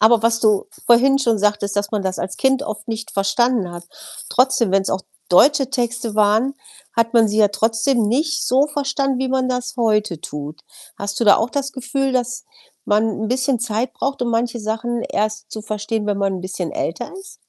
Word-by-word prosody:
Aber 225 +1 +5
was 230 0 +2
du 215 -3 +2 0.2
vorhin 270 +3 +5
schon 230 -5 +1
sagtest, 205 0 0
dass 205 0 -1
man 210 -2 -1
das 190 -1 -2
als 185 - -4
Kind 265 0 +2
oft 215 -2 -6
nicht 225 0 -4
verstanden 200 +1 +1
hat, 175 0 -9 0.4
trotzdem, 255 -4 +2
wenn's 195 0 +2
auch 190 - -1 0.3
deutsche 270 - +4
Texte 240 -4 -2
waren, 215 +6 +3 0.4
hat 230 0 +1
man 225 -2 +5
sie 210 +1 -1
ja 210 -1 +6
trotzdem 225 +4 +1
nicht 300 +7 0
so 265 +3 +3
verstanden, 275 -2 -1
wie 265 0 -1
man 260 0 0
das 250 0 -3
heute 210 -7 +1
tut. 150 +1 -7 0.4
Hast 200 0 -4
du 235 - +1
da 205 - +7
auch 225 +2 -1
das 275 0 -2
Gefühl, 270 +1 -2
dass 250 0 -2 0.4
man 210 +1 +2 0.2
'n 220 - -2
bisschen 260 +1 +1
Zeit 235 +1 -2
braucht, 275 0 -3
um 240 - -1
manche 235 0 -1
Sachen 225 +2 -2
erst 215 0 -2
zu 215 - -6
verstehen, 210 0 -3
wenn 205 -1 0
man 195 -1 0
'n 185 - -5
bisschen 185 -2 -4
älter 210 +9 -3
ist? 385 - -13
230 Hz, 200 wpm, -20 LUFS, 210-255 Hz, 0.4 s, da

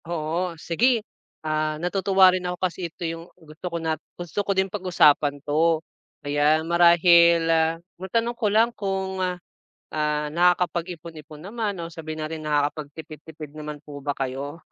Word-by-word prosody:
Oo 165 +1 -2
sige, 220 +8 +1 0.4
ah, 155 0 0
natutuwa 190 +2 +4
rin 185 - -1
ako 180 0 -3
kasi 180 -1 -2
ito 170 - -7
yung 165 +1 -5
gusto 160 0 -13
ko 170 - -3
na 160 -1 -1 0.2
gusto 175 +3 -3
ko 200 - -2
din 190 - +4
pag-usapan 175 -7 +3
'to 160 +3 +3 0.5
kaya 145 +2 +2
marahil, 170 0 +6
ah, 165 0 +2 0.2
matanong 230 +5 -1
ko 235 -2 -1
lang 220 +3 +4
kung, 190 -2 -3 0.5
ah, 150 -1 -3
nakakapag-ipon-ipon 170 -2 -1
naman 210 +2 -3
o 165 - -6
sabihin 155 -1 -6
natin 155 0 -5
nakakapagtipid-tipid 150 +1 -4
naman 150 -1 -7
po 145 -1 -9
ba 145 0 -3
kayo? 140 +4 -5
165 Hz, 145 wpm, -24 LUFS, 155-180 Hz, 0.5 s, marahil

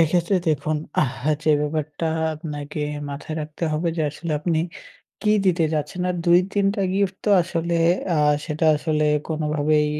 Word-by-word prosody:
এক্ষেত্রে 170 +4 +3
দেখুন, 155 0 0 0.3
আহ 130 -2 -4 0.2
যে 155 - +3
ব্যাপারটা 150 +1 -2 0.3
আপনাকে 150 -1 -6 0.3
মাথায় 150 +2 -6
রাখতে 155 +2 -5
হবে 160 +3 0
যে 160 - 0
আসলে 165 +2 -5
আপনি 160 0 +1 0.6
কী 210 - +3
দিতে 175 -2 +3
চাচ্ছেন। 155 +4 -2
আর 180 - -2
২-৩ 185 +3 +3
টা 205 - -2
গিফট 195 -1 +1
তো 210 - +2
আসলে 170 -1 -1 0.4
আ - - +2 0.3
সেটা 155 0 0
আসলে 155 0 0 0.2
কোনোভাবেই 155 -1 +1
155 Hz, 150 wpm, -23 LUFS, 150-175 Hz, 0.6 s, এক্ষেত্রে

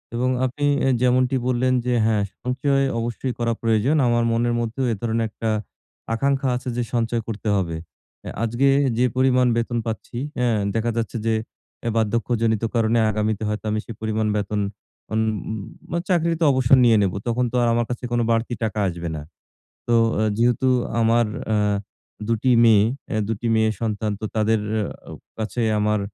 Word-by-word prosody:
এবং 125 +2 +1 0.2
আপনি 135 +3 -2 0.2
এ - - +4
যেমনটি 125 +1 +3
বললেন 130 0 +2
যে, 125 - +1
হ্যাঁ, 110 -2 +2 0.2
সঞ্চয় 135 +2 +1 0.2
অবশ্যই 120 +2 -3
করা 115 0 +1
প্রয়োজন। 115 +5 +2
আমার 120 0 +2
মনের 120 +1 +1
মধ্যেও 120 +3 -2
এ - - -2
ধরনের 115 -1 0
একটা 110 +1 -3 0.7
আকাঙ্খা 135 +3 +1
আছে 125 +1 -4
যে 120 - +1
সঞ্চয় 115 0 0
করতে 110 -1 -5
হবে। 85 -4 -1 0.5
এ - - -3
আজকে 120 +4 +2 0.2
এ - - +2
যে 125 - +3
পরিমাণ 130 -1 +4
বেতন 120 +1 -1
পাচ্ছি, 115 +1 -5 0.2
হ্যাঁ, 120 -3 +2 0.2
দেখা 115 +1 0
যাচ্ছে 115 0 -2
যে, 115 - +2 0.5
এ - - +2
বার্ধক্যজনিত 115 0 0
কারণে 115 0 +2
আগামীতে 110 0 -1
হয়তো 105 +1 -3
আমি 110 - 0
সেই 115 - -8
পরিমাণ 110 0 -1
বেতন 105 0 -1 0.5
উম 110 - +2 0.7
উম - - -9
আ - - +2
চাকরিতে 170 -2 +1
অবসর 130 0 +4
নিয়ে 115 -2 +5
নেব, 95 -2 +1
তখন 120 +2 +1
তো - - -5
আর 120 - +3
আমার 120 0 +1
কাছে 125 +1 -5
কোনো 120 0 +1
বাড়তি 115 +2 0
টাকা 110 -1 -1
আসবে 85 -1 -4
না। 75 - -5 0.7
তো, 120 - +3 0.2
অ্যা 110 - +1
যেহেতু 120 +2 +2 0.3
আমার 115 +1 +3 0.3
আ - - +3 0.7
২ 115 - +3
টি 130 - +4
মেয়ে 110 -3 +6 0.3
অ্যা 110 - 0
২ - - 0
টি 120 - -1
মেয়ে 110 0 +3
সন্তান, 110 -1 -1
তো - - -5
তাদের 110 0 +2 0.5
আও - - -8 0.2
কাছে 110 +2 -2 0.2
আমার 105 0 +1
115 Hz, 180 wpm, -22 LUFS, 110-125 Hz, 0.7 s, মেয়ে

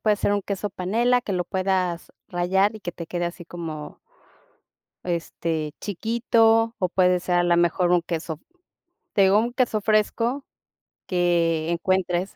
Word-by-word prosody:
puede 210 -1 +2
ser 205 - 0
un 205 - +1
queso 200 +1 -4
panela 235 +8 +1
que 200 -5 -4
lo 180 - -1
puedas 185 -2 -1 0.2
rallar 190 +4 +1
y 215 - -9
que 175 - -5
te 170 - -8
quede 175 0 -2
así 175 0 -7
como 160 -3 -7 1.1
este, 165 -3 -3
chiquito 225 +2 +2
o 185 - 0
puede 180 0 +3
ser 180 0 0
a 175 - +4
la 175 -1 +3
mejor 175 +1 +2
un 175 - +3
queso, 165 -2 -4 0.7
te 200 - +4
digo 195 +2 +5
un 235 +2 0
queso 240 -4 +1
fresco 230 +5 +1 0.6
que 170 -3 +1
encuentres, 185 +1 0
185 Hz, 155 wpm, -24 LUFS, 175-210 Hz, 1.1 s, digo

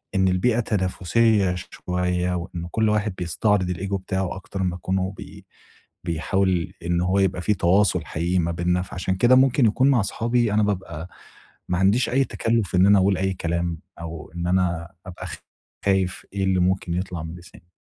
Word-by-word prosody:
إن 95 0 +3
البيئة 100 +6 +2
تنافِسية 100 0 +1
شوية، 90 0 -2
وإن 85 -1 -5
كل 110 -1 +2
واحد 105 -1 0
بيستعرض 90 +2 +1
الego 95 +3 -4
بتاعه، 95 -1 -2
أكتر 95 0 -5
ما 90 -1 -1
يكونوا 95 +1 -2
بي - - -11 0.6
بيحاول 90 +2 0
إن 85 0 +1
هو 90 +2 +1
يبقى 95 -2 +1
في 105 - +2
تواصل 90 -1 +2
حقيقي 85 +3 -1
ما 85 0 0
بيننا. 90 +1 0
فعشان 95 0 -3
كده 120 +6 +5
ممكن 130 0 +4
يكون 125 +5 +3
مع 130 -5 +4
صحابي، 115 +2 0
أنا 105 0 +3
بابقى 90 -5 -3 0.6
ما 90 - +1
عنديش 100 +6 +3
أي 135 +3 +3
تكلُّف 115 -7 -1
إن 90 +1 +5
أنا 100 0 +6
أقول 95 0 +2
أي 95 0 0
كلام، 85 -1 -2 0.2
أو 85 -2 -8
إن 85 0 -3
أنا 90 -2 0 0.2
أبقى 90 - -7 0.6
خايِف 95 -2 +1
إيه 100 -1 -1
اللي 95 -1 +2
ممكن 90 -1 0
يطلَع 90 -3 -3
من 80 +1 -7
لساني. 90 0 -16
95 Hz, 170 wpm, -23 LUFS, 90-100 Hz, 0.6 s, أنا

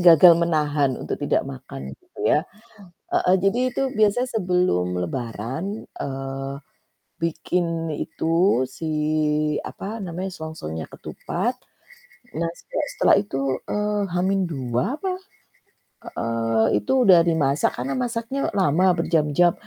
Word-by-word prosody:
gagal 175 0 +9
menahan 150 -5 +1
untuk - - -4
tidak - - +1
makan 65 +1 -8
gitu - - -31 0.2
ya. 150 - +4 0.7
Heeh, 180 - +3
jadi 195 +4 +2
itu 270 - -1 0.2
biasanya 220 +4 +3
sebelum 180 - +2 0.2
lebaran, 125 - -4
eee, 135 0 -4 0.7
bikin 165 0 -1
itu, 165 0 +1
si 130 +5 -8 0.8
apa 215 +4 -6
namanya, 180 +2 -4
selongsongnya 155 - -6
ketupat. 245 - -3 0.9
Nah 165 0 0
sejak - - -3
setelah - - +5
itu, 200 -10 -4 0.3
eee, 210 0 0
H-2 175 - 0
apa 380 +3 -2 0.9
heeh, 115 -1 0
Itu 250 - +2
udah 180 -3 +8
dimasak 150 -3 +2
karena 125 +3 -2
masaknya 245 +2 -2 0.2
lama, 180 0 +3
berjam-jam, 165 0 +3
165 Hz, 110 wpm, -23 LUFS, 135-195 Hz, 0.9 s, gagal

